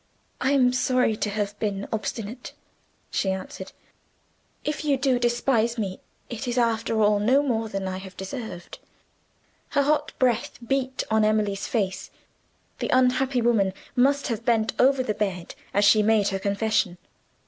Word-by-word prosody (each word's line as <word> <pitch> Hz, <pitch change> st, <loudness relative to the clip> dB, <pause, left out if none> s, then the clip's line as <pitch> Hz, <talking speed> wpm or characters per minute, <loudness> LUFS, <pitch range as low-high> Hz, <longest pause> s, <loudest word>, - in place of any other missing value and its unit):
"I 265 Hz, +2 st, +2 dB
am 250 Hz, -3 st, +4 dB
sorry 255 Hz, -2 st, +2 dB
to 210 Hz, -, -1 dB
have 205 Hz, 0 st, -3 dB
been 200 Hz, -2 st, -2 dB
obstinate," 215 Hz, +2 st, -5 dB, 0.6 s
she 195 Hz, -, 0 dB
answered. 190 Hz, 0 st, -5 dB, 0.9 s
"If 300 Hz, +1 st, -3 dB
you 285 Hz, -2 st, +2 dB
do 260 Hz, -2 st, +1 dB
despise 240 Hz, -1 st, +1 dB
me, 195 Hz, -4 st, -3 dB, 0.3 s
it 240 Hz, +2 st, -6 dB
is 245 Hz, 0 st, -2 dB
after 225 Hz, -2 st, +1 dB
all 210 Hz, 0 st, +4 dB
no 255 Hz, +7 st, +3 dB
more 225 Hz, -5 st, -1 dB
than 195 Hz, -2 st, -3 dB
I 185 Hz, 0 st, -3 dB
have 190 Hz, 0 st, -10 dB
deserved." 195 Hz, -3 st, -7 dB, 0.9 s
Her 285 Hz, -, +2 dB
hot 300 Hz, +2 st, +1 dB
breath 245 Hz, -3 st, +1 dB
beat 265 Hz, +1 st, -1 dB
on 220 Hz, 0 st, +3 dB
Emily's 210 Hz, -2 st, +1 dB
face: 195 Hz, -5 st, -2 dB, 0.7 s
the -, -, -2 dB
unhappy 255 Hz, 0 st, +2 dB
woman 210 Hz, -5 st, +2 dB, 0.2 s
must 280 Hz, +3 st, +3 dB
have 230 Hz, -1 st, -3 dB
bent 225 Hz, -2 st, +1 dB
over 265 Hz, 0 st, +4 dB
the 215 Hz, -, -1 dB
bed 195 Hz, -5 st, -3 dB, 0.2 s
as 205 Hz, +1 st, +3 dB
she 210 Hz, +1 st, +6 dB
made 210 Hz, -1 st, +3 dB
her 195 Hz, -1 st, -2 dB
confession. 200 Hz, -2 st, 0 dB
225 Hz, 155 wpm, -25 LUFS, 205-255 Hz, 0.9 s, she